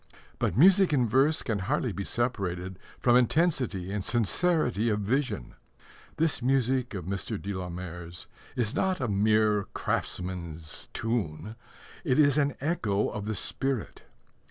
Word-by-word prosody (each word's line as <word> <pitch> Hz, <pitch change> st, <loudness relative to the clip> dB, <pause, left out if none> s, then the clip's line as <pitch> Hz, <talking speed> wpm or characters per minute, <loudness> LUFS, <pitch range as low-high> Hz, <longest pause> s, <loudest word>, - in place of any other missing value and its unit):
But -, -, 0 dB
music 185 Hz, +4 st, +6 dB
in 125 Hz, -4 st, +3 dB
verse 135 Hz, +7 st, +3 dB
can 110 Hz, -5 st, -1 dB
hardly 125 Hz, +4 st, -1 dB
be 100 Hz, -, -4 dB
separated 95 Hz, -6 st, -2 dB, 0.2 s
from 120 Hz, -1 st, +3 dB
intensity 125 Hz, -, +1 dB
and 100 Hz, -1 st, -2 dB
sincerity 120 Hz, -, +2 dB
of 105 Hz, -1 st, 0 dB
vision. 120 Hz, -, -1 dB, 0.6 s
This 160 Hz, -4 st, +1 dB
music 130 Hz, -2 st, +1 dB
of 90 Hz, -4 st, -5 dB
Mr. 100 Hz, +2 st, -3 dB
de 100 Hz, +1 st, -4 dB
la 90 Hz, -1 st, -4 dB
Mare's 85 Hz, -1 st, -7 dB, 0.3 s
is 115 Hz, -4 st, 0 dB
not 190 Hz, -1 st, 0 dB
a 130 Hz, -, -1 dB
mere 105 Hz, 0 st, +2 dB
craftsman's 85 Hz, -3 st, -3 dB
tune: 110 Hz, -3 st, -3 dB, 0.5 s
it 130 Hz, -7 st, +1 dB
is 145 Hz, -1 st, +5 dB
an 140 Hz, -2 st, +1 dB
echo 115 Hz, -, 0 dB
of 105 Hz, -, -5 dB
the 110 Hz, -, -2 dB
spirit. 135 Hz, +4 st, -2 dB
110 Hz, 140 wpm, -28 LUFS, 95-135 Hz, 0.6 s, music